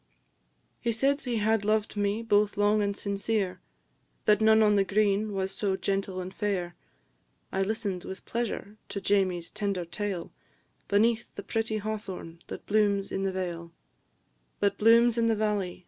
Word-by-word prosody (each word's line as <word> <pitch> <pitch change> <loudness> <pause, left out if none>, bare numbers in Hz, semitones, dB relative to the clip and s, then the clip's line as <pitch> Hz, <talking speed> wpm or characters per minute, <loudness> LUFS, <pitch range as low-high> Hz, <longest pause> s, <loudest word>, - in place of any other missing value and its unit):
He 235 - 0
said 275 +6 +2
he 245 -3 -1
had 220 0 +2
loved 215 +1 0
me 205 +2 0
both 210 -2 +2
long 205 +1 +3
and 200 0 -1
sincere, 200 -1 -1 0.6
That 210 0 +4
none 220 0 +6
on 210 -1 +4
the 200 -1 +4
green 205 +1 +1
was 190 -1 -2
so 195 -1 0
gentle 195 -1 -2
and 185 +1 -6
fair; 185 -4 -2 0.8
I 190 - 0
listen'd 200 -3 -2
with 190 0 -8
pleasure 225 -2 -3
to 200 - -3
Jamie's 190 -4 +1
tender 195 -4 -2
tale, 185 0 -4 0.6
Beneath 225 +3 +2
the 200 - -6
pretty 220 +2 -1
hawthorn 200 -6 -6
that - - -8
blooms 205 -2 +1
in 190 - -2
the 195 0 0
vale 170 -3 -4 0.9
That 200 -1 +1
blooms 230 +2 +5
in 230 - +3
the 225 - +3
valley, 210 -4 -1
&c. - - -20
205 Hz, 165 wpm, -28 LUFS, 195-220 Hz, 0.9 s, none